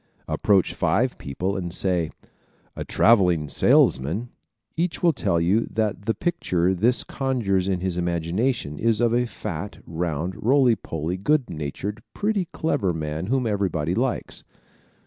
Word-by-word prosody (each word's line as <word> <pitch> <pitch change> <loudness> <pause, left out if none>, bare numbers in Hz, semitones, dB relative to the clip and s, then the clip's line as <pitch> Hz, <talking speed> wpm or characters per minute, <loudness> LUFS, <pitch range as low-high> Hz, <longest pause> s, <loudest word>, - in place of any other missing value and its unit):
Approach 100 -3 +2
five 125 +5 +1
people 90 +8 -3
and 90 -3 -3
say 90 -3 +1 0.7
"A - - -4
traveling 90 -9 +3
salesman," 80 - +3 0.5
each 170 +2 -2
will 170 -2 +5
tell 85 - 0
you 95 +7 +2
that 105 -2 -2
the 115 - 0
picture 95 - 0
this 115 +7 +2
conjures 110 -9 -1
in 95 -2 -1
his 95 -2 -2
imagination 85 - -1
is 115 -2 +2
of 120 -1 +2
a 120 0 +2
fat, - - -6
round, 85 +1 -3
roly 130 0 +4
poly, 80 -1 -4
good 140 +5 +1
natured, 85 +8 -5
pretty 205 -3 0
clever 125 - 0
man 80 +2 -4
whom 130 +1 +1
everybody 95 -7 0
likes. 125 +5 -2
95 Hz, 140 wpm, -24 LUFS, 85-120 Hz, 0.7 s, will